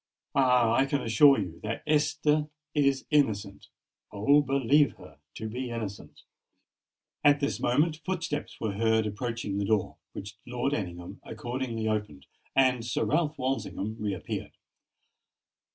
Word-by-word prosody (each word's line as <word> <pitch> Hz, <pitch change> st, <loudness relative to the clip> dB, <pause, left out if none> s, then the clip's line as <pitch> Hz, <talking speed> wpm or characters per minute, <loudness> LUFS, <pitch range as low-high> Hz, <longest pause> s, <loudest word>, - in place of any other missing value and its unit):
Ah! 125 Hz, -4 st, +4 dB
I 135 Hz, +3 st, +3 dB
can 140 Hz, -1 st, -1 dB
assure 135 Hz, +5 st, +6 dB
you, 90 Hz, -5 st, -4 dB
that 110 Hz, +2 st, -4 dB
Esther 150 Hz, 0 st, +2 dB, 0.3 s
is 140 Hz, -2 st, +2 dB
innocent—oh! 110 Hz, +1 st, 0 dB
believe 140 Hz, +1 st, +3 dB
her -, -, -15 dB, 0.2 s
to 110 Hz, -, -5 dB
be 125 Hz, +3 st, -4 dB
innocent!" 110 Hz, -4 st, -6 dB, 1.0 s
At 145 Hz, 0 st, +5 dB
this 140 Hz, 0 st, -1 dB
moment 150 Hz, +5 st, +1 dB
footsteps 165 Hz, -4 st, -3 dB
were 110 Hz, -3 st, -2 dB
heard 110 Hz, +1 st, +2 dB
approaching 105 Hz, -1 st, -3 dB
the 100 Hz, -, 0 dB
door, 105 Hz, -2 st, 0 dB, 0.2 s
which 100 Hz, +1 st, -8 dB
Lord 125 Hz, +3 st, -1 dB
Ellingham 90 Hz, -7 st, -5 dB
accordingly 120 Hz, -2 st, -4 dB
opened; 105 Hz, -11 st, -3 dB, 0.3 s
and 130 Hz, -3 st, +3 dB
Sir 115 Hz, -1 st, -1 dB
Ralph 150 Hz, +7 st, +1 dB
Walsingham 125 Hz, -5 st, -2 dB
re 105 Hz, -2 st, -1 dB
appeared. -, -, -5 dB
120 Hz, 130 wpm, -28 LUFS, 105-145 Hz, 1.0 s, assure